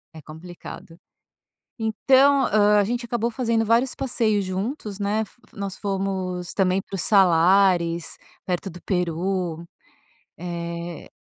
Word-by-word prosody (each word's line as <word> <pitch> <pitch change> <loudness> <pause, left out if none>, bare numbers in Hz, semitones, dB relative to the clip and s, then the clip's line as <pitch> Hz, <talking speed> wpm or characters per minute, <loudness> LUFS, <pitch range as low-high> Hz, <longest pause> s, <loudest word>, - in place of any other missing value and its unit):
É 160 - -10
complicado, 165 +2 -11 0.8
então, 265 +5 +4
ah, 210 0 +4
a 205 - +4
gente 240 +3 -2
acabou 235 -1 -1
fazendo 230 -1 0
vários 235 +4 +2
passeios 220 -6 +1
juntos, 200 +2 -4
né, 210 +2 0
fo 230 - -22
nós 200 -2 -5
fomos 190 -3 -3
também 190 -1 +2
para 195 - -11
os 190 - 0
Salares, 175 -2 +3 0.3
perto 180 +1 -2
do 175 +1 -12
Peru, 180 -1 -2 0.7
eh 170 -1 -6
195 Hz, 125 wpm, -23 LUFS, 175-220 Hz, 0.8 s, então